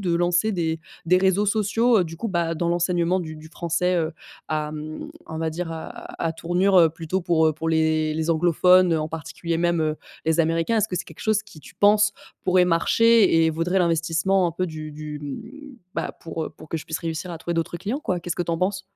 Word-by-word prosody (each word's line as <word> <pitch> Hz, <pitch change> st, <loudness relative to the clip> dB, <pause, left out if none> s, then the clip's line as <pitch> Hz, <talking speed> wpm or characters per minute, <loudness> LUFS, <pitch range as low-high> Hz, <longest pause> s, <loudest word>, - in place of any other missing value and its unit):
de 175 Hz, -3 st, 0 dB
lancer 175 Hz, +5 st, +2 dB
des 165 Hz, -3 st, -1 dB, 0.3 s
des 180 Hz, +2 st, +5 dB
réseaux 190 Hz, +2 st, +2 dB
sociaux, 220 Hz, +3 st, +3 dB
heu, 180 Hz, -, +2 dB
du 165 Hz, 0 st, -8 dB
coup, 225 Hz, -, -3 dB
bah, 170 Hz, -3 st, 0 dB
dans 170 Hz, +1 st, -1 dB
l'enseignement 175 Hz, +1 st, +1 dB
du 160 Hz, -2 st, -6 dB
du 155 Hz, +1 st, -12 dB
français, 175 Hz, +2 st, 0 dB
heu, 160 Hz, -1 st, 0 dB, 0.4 s
à 150 Hz, -1 st, -1 dB
mmh, 155 Hz, 0 st, -7 dB, 0.2 s
on 160 Hz, 0 st, -6 dB
va 160 Hz, 0 st, -1 dB
dire 165 Hz, +1 st, -4 dB
à 160 Hz, -1 st, -6 dB
à -, -, -6 dB
à -, -, -2 dB
tournure, 180 Hz, +4 st, +1 dB
heu, 165 Hz, -2 st, +6 dB
plutôt 165 Hz, +3 st, -3 dB
pour, 165 Hz, -2 st, +2 dB
heu, -, -, +1 dB
pour 160 Hz, +2 st, -4 dB
les 160 Hz, -1 st, +1 dB
les 160 Hz, +1 st, -1 dB
anglophones, 175 Hz, +2 st, +4 dB
heu, 160 Hz, -, +1 dB
en 155 Hz, -, -3 dB
particulier 165 Hz, +1 st, -4 dB
même, 170 Hz, -1 st, +1 dB
heu, 155 Hz, -1 st, 0 dB, 0.3 s
les 160 Hz, +1 st, +1 dB
Américains? 165 Hz, +7 st, +1 dB
Est-ce 215 Hz, -, +2 dB
que 180 Hz, -, -3 dB
c'est -, -, -3 dB
quelque 160 Hz, -, -14 dB
chose 215 Hz, -1 st, +1 dB
qui, -, -, -15 dB
tu -, -, -15 dB
penses, 205 Hz, 0 st, +4 dB, 0.3 s
pourrait 185 Hz, -1 st, +4 dB
marcher 180 Hz, +1 st, +4 dB
et -, -, +2 dB
vaudrait 165 Hz, +4 st, 0 dB
l'investissement, 170 Hz, +2 st, +2 dB
un -, -, -5 dB
peu, 185 Hz, +2 st, -2 dB
du 155 Hz, -2 st, -7 dB
du 150 Hz, 0 st, -7 dB
mmh, 245 Hz, -, -8 dB, 0.2 s
bah, -, -, -2 dB
pour 165 Hz, -1 st, -4 dB
heu, -, -, -6 dB
pour 155 Hz, -, -15 dB
que 165 Hz, -, -2 dB
je 155 Hz, -, -6 dB
puisse 160 Hz, -, -3 dB
réussir 165 Hz, +1 st, -4 dB
à 165 Hz, -, -6 dB
trouver 170 Hz, +1 st, -3 dB
d'autres 165 Hz, +1 st, -2 dB
clients 225 Hz, -, -3 dB
quoi»? 180 Hz, -, -2 dB
Qu'est-ce 175 Hz, -, -4 dB
que -, -, 0 dB
tu 170 Hz, -1 st, -2 dB
en 165 Hz, -, -1 dB
penses? 185 Hz, +1 st, -1 dB
170 Hz, 240 wpm, -24 LUFS, 160-185 Hz, 0.4 s, heu